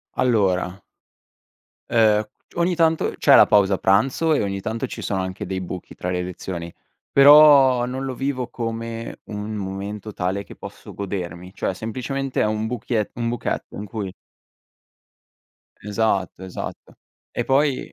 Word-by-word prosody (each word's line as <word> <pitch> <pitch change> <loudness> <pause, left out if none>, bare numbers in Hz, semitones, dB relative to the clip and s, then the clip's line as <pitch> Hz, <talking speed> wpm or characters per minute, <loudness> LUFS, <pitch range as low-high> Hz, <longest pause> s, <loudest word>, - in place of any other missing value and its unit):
Allora 100 -6 +1 1.1
uhm, 110 -2 +4 0.3
ogni 175 +1 +1
tanto 165 -1 +2
c'è - - +6
la - - +9
pausa 100 -2 +3
pranzo, 130 +11 +2
e - - +2
ogni 100 -1 -2
tanto 110 +3 -3
ci - - -7
sono 95 -2 -1
anche 95 +2 -5
dei 95 0 -3
buchi 90 0 -7
tra 90 - -4
le 90 0 -1
lezioni, 85 -1 -6 0.4
però 140 -3 +7
non 130 +2 -4
lo 130 -2 -4
vivo 135 -2 -2
come 115 -1 -5
un 105 +1 -5
momento 100 +2 -5
tale 95 +2 -2
che - - -13
posso - - -10
godermi, 90 -2 -5
cioè - - -2
semplicemente 130 +6 -3
è - - +3
un 110 +1 -1
buchiet 115 -2 -2
un 120 0 -2
buchetto 120 - -3
in 105 - -6
cui 100 -2 -5 1.7
Esatto, 100 -3 -1
esatto. 95 - -7 0.4
E 120 - -2
poi 135 +1 +1
110 Hz, 145 wpm, -22 LUFS, 95-125 Hz, 1.7 s, la